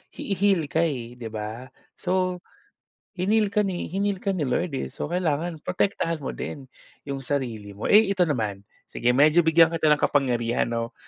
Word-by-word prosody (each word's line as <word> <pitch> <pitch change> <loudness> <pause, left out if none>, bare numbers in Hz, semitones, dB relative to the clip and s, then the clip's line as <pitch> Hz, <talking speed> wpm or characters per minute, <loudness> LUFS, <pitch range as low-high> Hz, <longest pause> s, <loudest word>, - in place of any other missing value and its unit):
hi 200 - -3
heal 195 -3 +2
ka 160 - +1
eh, 120 -6 -4
'di 115 -2 -6
ba 110 +4 -6 0.3
so, 185 -1 -1 0.8
hineal 210 +3 +2
ka 210 +1 +2
ni 180 -4 -4
hineal 200 +2 -1
ka 200 - 0
ni 150 -6 -1
Lord 140 +4 -1
eh, - - -3
so 150 - -5
kailangan 170 -1 -1
protektahan 180 -3 -1
mo - - -3
din 135 -2 -6 0.4
yung 140 -1 -4
sarili 120 -7 -3
mo. 105 - -5
Eh, 210 -1 +6
ito 185 - +2
naman, 110 -9 -2 0.2
sige 120 - 0
medyo 155 +5 +5
bigyan 165 0 +5
kita 160 -2 +2
ng 150 - +5
kapangyarihan 120 -4 +1
'no 115 +1 -3
155 Hz, 180 wpm, -25 LUFS, 125-180 Hz, 0.8 s, Eh